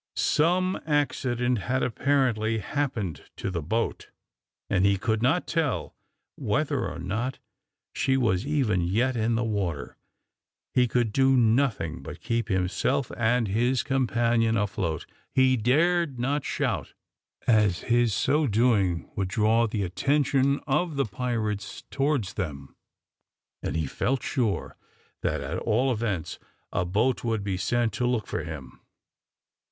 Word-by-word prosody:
Some 180 +4 +2
accident 125 -5 +1
had, 130 +5 -1
apparently, 120 -4 +1
happened 110 - -3
to - - -3
the 85 -3 -2
boat, 110 +9 -2 0.6
and 95 - +1
he 100 0 +4
could 110 +2 0
not 140 +9 +2
tell 140 - -1 0.4
whether - - 0
or - - -7
not 115 +9 -3 0.6
she 135 0 +1
was 110 -7 +1
even 130 -10 +1
yet 115 +9 +1
in 115 0 +1
the 115 - 0
water. 100 -9 -2 0.8
He 125 -1 +4
could 115 -2 0
do 135 -1 +4
nothing 115 - +1
but - - -8
keep 115 0 -1
himself 95 +8 0
and 120 0 +2
his 120 +5 +1
companion 115 -3 +1
afloat. 95 -6 -2 0.3
He 130 0 +5
dared 150 +5 +2
not 140 +4 0
shout, - - -2 0.5
as 105 -6 +3
his 120 -1 +2
so 150 +9 +2
doing 105 -7 +2
would 95 -3 -1
draw 110 +4 +2
the 105 -2 -2
attention 140 +7 +1
of 150 +3 0
the 140 - +1
pirates 110 -2 -3
towards 135 -8 0
them, 70 -8 -5 0.9
and 70 - -3
he 80 -1 0
felt 125 - -1
sure 115 -7 -1 0.5
that, - - -1
at - - -3
all 125 +4 +1
events, 105 -8 -2 0.3
a 90 - 0
boat 110 +8 +1
would 115 -3 -1
be 100 -2 -1
sent 120 +4 0
to 125 - 0
look 120 -4 0
for 85 - -3
him. 75 -5 -8
115 Hz, 135 wpm, -27 LUFS, 100-130 Hz, 0.9 s, He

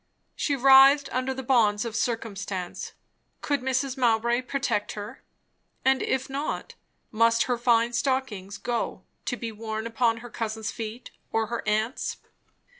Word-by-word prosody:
She 285 - 0
writhed 270 +2 +7
under 255 +1 0
the 265 0 -5
bonds 225 -4 +3
of 230 -1 -5
circumstance. 200 -6 -3 0.5
Could 285 -3 0
Mrs. 265 +1 -1
Mowbray 235 0 +2
protect 255 -5 -1
her? 205 0 -8 0.6
and 265 0 +4
if 265 0 -1
not, 280 +3 -4 0.4
must 230 +1 +4
her 250 - 0
fine 235 0 +2
stockings 235 -6 -1
go, 240 -1 -3 0.2
to 245 - -2
be 230 -1 -4
worn 220 0 -5
upon 230 0 +1
her - - -8
cousin's 220 -1 -3
feet, 225 +2 -7 0.2
or 225 0 +1
her 235 - -1
aunt's? 220 +4 -1
235 Hz, 140 wpm, -26 LUFS, 220-260 Hz, 0.6 s, writhed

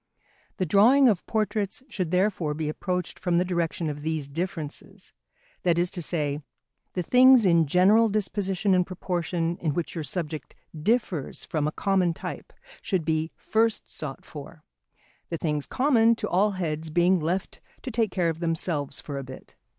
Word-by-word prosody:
The 185 - 0
drawing 235 - +6
of 205 -7 +2
portraits 215 0 -1
should 185 - -3
therefore 180 -4 +1
be 155 0 -2
approached 180 +2 -3
from 175 -2 +1
the 180 - +2
direction 170 -2 -1
of 145 -1 -4
these 155 -2 -2
differences; 160 0 -6 0.5
that 175 -2 +2
is 175 +1 +1
to 180 - -4
say, 150 -3 -2 0.5
the 180 - -2
things 255 +1 +6
in 170 -3 +4
general 200 +8 +5
disposition 200 -2 0
and 180 -1 +4
proportion 175 -2 -2
in 155 -4 -2
which 175 - -2
your 165 - -4
subject 155 +1 -5 0.2
differs 180 - -1
from 150 -2 -1
a - - -1
common 185 -2 +1
type, - - -7 0.3
should 185 -6 -1
be 160 0 0
first 225 0 0
sought 145 -3 -7
for, 150 +1 -10 0.7
the 165 - -2
things 150 -3 -1
common 230 -4 +3
to 215 -2 -4
all 200 +3 +2
heads 160 -4 -3
being 175 +3 +3
left 175 +4 -3 0.2
to 260 - -4
take 225 -1 +1
care 175 -2 0
of 165 0 -4
themselves 165 -4 -2
for 140 -2 -5
a - - -5
bit. 130 0 -11
175 Hz, 165 wpm, -26 LUFS, 155-200 Hz, 0.7 s, drawing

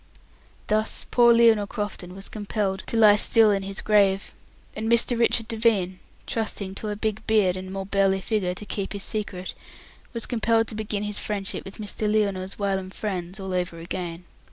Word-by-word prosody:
Thus 215 +1 0
poor 240 -1 +6
Lionel 230 -3 +5
Crofton 195 -4 -5
was 195 0 -7
compelled 205 -2 -2
to 230 - -1
lie 210 -2 +7
still 220 0 +5
in 200 -1 +1
his 195 +1 -4
grave, 200 -2 +2 0.4
and 220 +2 -2
Mr. 235 +1 +3
Richard 230 -1 +2
Devine, 215 -5 +1 0.3
trusting 210 -4 -3
to 210 +2 -5
a 210 - -2
big 215 +1 -3
beard 205 -5 +3
and 185 0 -6
more 195 0 -4
burly 195 -1 +2
figure 190 -3 -1
to 210 - -8
keep 200 -1 -4
his 200 -1 -4
secret, 200 -4 -3 0.6
was 230 -3 -3
compelled 225 -1 +1
to - - -6
begin 210 -1 -3
his 210 -1 -2
friendship 200 -2 -3
with 195 - -9
Mr. 210 0 -2
Lionel's 195 -3 0
whilom 195 -2 -1
friends 190 -2 -4
all 190 -1 -4
over 180 -2 -2
again. 170 0 -5
205 Hz, 180 wpm, -25 LUFS, 190-220 Hz, 0.6 s, lie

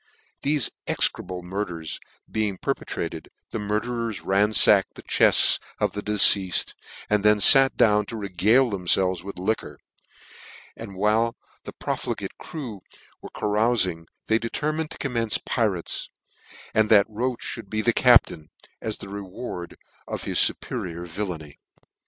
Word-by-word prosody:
Thefe 145 -4 +1 0.2
execrable 90 -1 -1
murderers 90 -4 -5 0.3
being 105 -3 -2
perpetrated, - - -4 0.2
the 115 - -3
murderers 110 +1 -3
ranfacked 100 0 +3
the - - -12
chefts - - +5 0.2
of - - 0
the 105 - -4
de 105 +1 -3
ceafed, 95 -2 +5 0.3
and 105 -1 +1
then 105 0 +4
fat 135 +5 +7
down 105 -1 +3
to 115 - -6
regale 105 +6 +2
themfelves 90 -1 +1
with 100 -1 -8
liquor; 90 -6 -3 1.0
and 105 -4 -9
while 110 +4 +1 0.3
the - - -8
profligate - - -4
crew 120 - -8 0.4
were - - -9
earoufmg, 105 -6 0 0.2
they 110 0 +2
determined 155 +7 -3
to - - -10
commence 115 -5 -1
pirates, 105 -8 -2 0.6
and 110 -1 +2
that 105 -2 +6
Roche 120 +3 -3
mould 110 -4 -10
be 110 +1 -2
the 120 - +3
captain, 115 -12 +4 0.3
as 110 -1 -3
the - - -10
reward 95 -2 -7 0.3
of - - -5
his - - 0
fuperior 85 0 0
villainy. 85 -5 -6
105 Hz, 135 wpm, -24 LUFS, 95-115 Hz, 1.0 s, fat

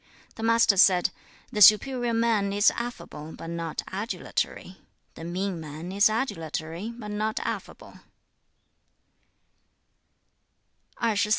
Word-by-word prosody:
The - - -10
Master 230 -2 +4
said, 180 -1 +5 0.4
'The 210 -4 -2
superior 240 +4 +6
man 225 -3 +1
is 205 +1 +4
affable, 235 -10 -7
but 165 - -7
not 165 -2 -4
adulatory; 190 -2 -3 0.4
the - - -10
mean 180 +1 -3
man 155 +3 -7
is 200 +2 +4
adulatory, 170 - -3
but 210 -3 -7
not 215 +1 -2
affable.' - - -6
200 Hz, 100 wpm, -26 LUFS, 170-225 Hz, 0.4 s, superior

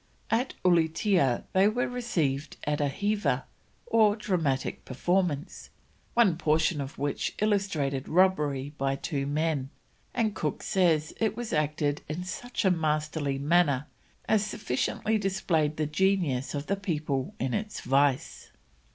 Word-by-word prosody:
At 240 +4 +1
Ulietea 165 - +3
they 190 +2 +5
were 240 +4 0
received 160 - -2
at 150 0 -1
a 145 - +2
heava 205 +8 0 0.4
or 215 - +4
dramatic 165 -11 -1
performance, 165 +2 -1 0.5
one 210 -9 +4
portion 155 -1 +2
of 135 0 -7
which 145 0 -2
illustrated 195 -11 0
robbery 150 -6 +2
by 135 0 +1
two 140 -1 -3
men, 150 -2 0 0.5
and 220 -3 +1
Cook 155 -6 -3
says 170 -6 +2
it 220 -1 0
was 240 -2 -4
acted 150 -1 0
"in 160 +4 -3
such 245 +5 -4
a 190 - +5
masterly 150 -3 0
manner 145 -2 +2 0.4
as 215 -2 +3
sufficiently 210 - -1
displayed 170 -6 0
the 155 - 0
genius 155 -5 +1
of 145 0 -3
the 200 - -1
people 150 -8 -2
in 130 +1 -1
this 210 +5 -3
vice." 135 +1 +1
160 Hz, 135 wpm, -28 LUFS, 145-195 Hz, 0.5 s, they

